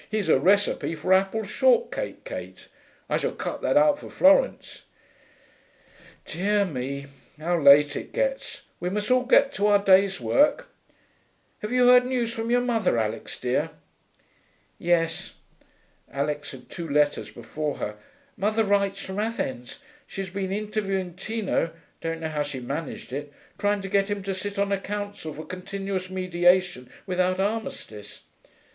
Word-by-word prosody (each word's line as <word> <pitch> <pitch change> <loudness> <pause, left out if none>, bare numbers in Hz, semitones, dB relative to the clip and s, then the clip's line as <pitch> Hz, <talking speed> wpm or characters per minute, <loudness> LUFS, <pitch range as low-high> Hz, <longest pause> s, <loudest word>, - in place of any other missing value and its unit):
Here's 210 -5 -1
a 135 - +5
recipe 195 0 +2
for 170 +5 +1
apple 195 +4 +2
shortcake, 480 - +1
Kate: - - -8 0.4
I - - +1
shall - - -2
cut - - -5
that - - +2
out 295 -1 +4
for - - -10
Florence.... 295 - +3 1.4
Dear 200 +3 +1
me, 140 -3 -4 0.3
how 170 +3 0
late 145 +1 +7
it - - -6
gets! - - -2 0.2
We 180 - -2
must 210 +4 -2
all 255 0 +3
get 275 +2 +4
to 205 +2 +1
our 205 -1 +6
day's 195 0 +4
work.... 300 - +2 0.9
Have 210 - -5
you 250 0 +4
heard 250 0 +7
news 240 -3 -1
from 225 0 -4
your 245 +1 +3
mother, 230 - +1
Alix 110 0 -3
dear?' 125 0 0 1.1
'Yes.' 165 -1 0 0.8
Alix 145 +1 -2
had 130 -3 -11
two 170 -3 -6
letters 145 0 +1
before 150 -1 -4
her. 105 - -4 0.4
'Mother 215 +3 +1
writes 200 -1 +1
from 190 +1 -5
Athens. 135 - -3 0.3
She's 195 -1 -6
been 190 -1 -3
interviewing 195 -3 -2
Tino 195 -4 -2 0.3
(don't 165 0 -3
know 160 - -2
how 150 -1 -2
she 145 -2 -4
managed 140 +1 -5
it); 145 +1 -5 0.3
trying 205 0 +1
to - - -4
get 195 0 +2
him 205 -1 -3
to 195 0 -2
sit 200 +2 -5
on 200 0 0
a 200 - +1
council 205 -4 -5
for 155 - -8
Continuous 190 0 -5
Mediation 180 -6 +1 0.2
without 185 -1 0
Armistice. 195 - -4
195 Hz, 150 wpm, -25 LUFS, 160-210 Hz, 1.4 s, late